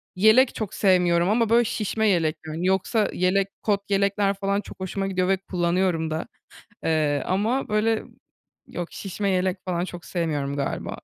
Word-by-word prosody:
yelek 220 +7 +5
çok 215 -4 -4
sevmiyorum 180 -2 +3
ama, 225 +1 +2
böyle, 235 +1 +5
şişme 220 0 -1
yelek, 165 -5 +2
yani, 160 +3 -3
yoksa 195 +4 +1
yelek 190 +2 +2 0.2
kot 200 -2 0
yelekler 200 0 +2
falan 200 0 -1
çok - - -12
hoşuma 195 +1 -3
gidiyor 185 -1 0
ve 195 0 +3
kullanıyorum 175 -3 0
da, 155 - -3 0.6
eee, 150 -3 +1
ama, 220 +8 0
böyle, 215 +1 +1 0.6
yok, 175 -1 -5
şişme 200 +1 -3
yelek 185 0 0
falan 175 -1 -1
çok 175 -2 -8
sevmiyorum 145 -5 -2
galiba. 140 - -3
190 Hz, 160 wpm, -24 LUFS, 175-205 Hz, 0.6 s, yelek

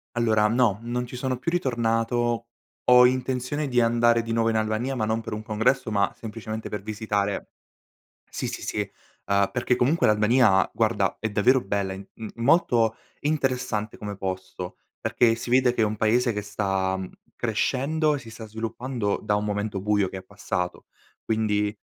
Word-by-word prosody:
Allora 110 -3 +3
no, 115 -4 +2
non 120 +1 -2
ci 125 - -9
sono 130 0 -2
più 150 +7 -2
ritornato. 120 -5 0 0.4
Ho 125 0 +8
intenzione 130 +3 0
di 125 -1 +2
andare 115 0 +4
di 115 0 -3
nuovo 115 0 +2
in 110 - +1
Albania 110 +5 -1
ma 110 -4 0
non 110 +1 0
per 115 - -7
un 105 0 -5
congresso 110 +4 +1
ma 100 -1 +2
semplicemente 110 0 -6
per 105 - -4
visitare 105 -1 -2 0.8
sì, - - -4
sì, - - -5
sì. - - -2 0.4
Uhm, 100 0 +2
perché 120 +2 +1
comunque 140 +7 +2
l'Albania 105 -2 +4
guarda - - +1
è 110 - -1
davvero 120 +6 +4
bella 100 -2 -2
in 95 +1 -8
m 110 -1 -7
molto 115 -4 +3 0.2
interessante 125 -7 -1
come 105 -1 -6
posto, 95 -1 -5 0.2
perché 115 -2 +3
si 120 - -6
vede 125 0 +4
che 120 - 0
è - - +5
un 105 0 -1
paese 115 +3 +2
che 105 -1 -3
sta, 95 -2 -1
mhmm, 95 -1 -6 0.3
crescendo 155 +3 +1
e - - -4
si 120 -4 -11
sta 115 0 -9
sviluppando 115 0 -3
da 105 -1 +1
un 105 - -1
momento 105 -1 -2
buio 105 -1 +1
che 95 - -6
è - - -10
passato. 90 -2 -4 0.4
Quindi 105 -1 0
115 Hz, 175 wpm, -25 LUFS, 105-125 Hz, 0.8 s, Ho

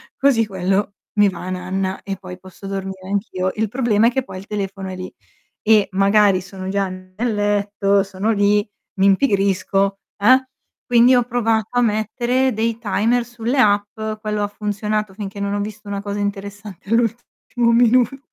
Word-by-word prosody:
così 265 -5 +3
quello 195 +1 -1 0.2
mi 205 -1 +5
va 185 -1 -7
nanna, 185 +1 -3
e 195 -1 -4
poi 185 -1 -10
posso 185 +1 -12
dormire 190 -1 -5
anch'io. 195 -2 -1
Il 220 -1 -1
problema 230 -2 +2
è - - +3
che 265 +2 0
poi 185 - -9
il 190 - -9
telefono 195 -2 -4
è 185 - -5
lì, 185 0 -7 0.5
e 215 -2 +4
magari 195 0 +4
sono 185 +1 -8
già 195 0 0
nel 185 +5 -4
letto, 205 -1 +1
sono 195 +3 -1
lì, 205 0 +2 0.3
mi 195 - +4
impigrisco, 195 -2 +2 0.2
eh, 255 +5 +4 0.4
quindi 245 +1 +5
ho 245 - +4
provato 225 -3 0
a - - +4
mettere 240 +4 +1
dei 225 +1 -1
timer 230 +2 +1
sulle 240 +2 -3
app. 205 -3 +3 0.3
Quello 210 -1 -2
ha 205 - 0
funzionato 210 0 -3
finché 200 -1 -7
non 200 0 -2
ho 205 - -1
visto 210 0 -6
una 200 0 -4
cosa 205 0 -4
interessante 200 -1 -5
all'ultimo 235 +1 0
minuto. 245 +2 +4
205 Hz, 165 wpm, -20 LUFS, 195-225 Hz, 0.5 s, mi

